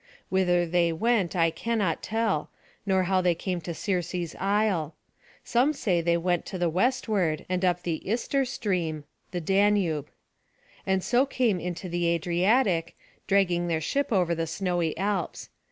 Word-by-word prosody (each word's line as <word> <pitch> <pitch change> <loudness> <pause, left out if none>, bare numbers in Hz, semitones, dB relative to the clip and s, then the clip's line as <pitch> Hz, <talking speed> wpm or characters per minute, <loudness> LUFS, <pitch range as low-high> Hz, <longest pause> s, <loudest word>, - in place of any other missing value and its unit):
Whither 180 -2 +2
they 170 0 +2
went 200 +1 +1
I 165 -2 +3
cannot 200 -1 -1
tell, 220 -8 -1 0.4
nor 190 -1 +3
how 185 +1 +2
they 175 -2 +2
came 180 +1 -3
to 170 - -5
Circe's 180 -4 -2
isle. 195 -6 0 0.5
Some 255 +6 +2
say 185 - 0
that - - -11
they 170 0 +3
went 175 0 0
to 190 - -5
the 175 -2 0
westward, 195 - 0
and 185 0 -1
up 180 -1 +1
the 165 -3 -2
Ister[A] 250 +5 0
stream, 180 - -2 0.3
and 190 0 -1
so 250 +3 +3
came 235 -8 +1
into 180 +2 -5
the 175 0 -1
Adriatic, 175 +2 +1 0.3
dragging 180 -3 +2
their 165 -2 0
ship 280 - -1
over 180 -5 +2
the 165 0 -2
snowy 175 -1 -1
Alps. 195 -1 -2
180 Hz, 150 wpm, -27 LUFS, 170-205 Hz, 0.5 s, I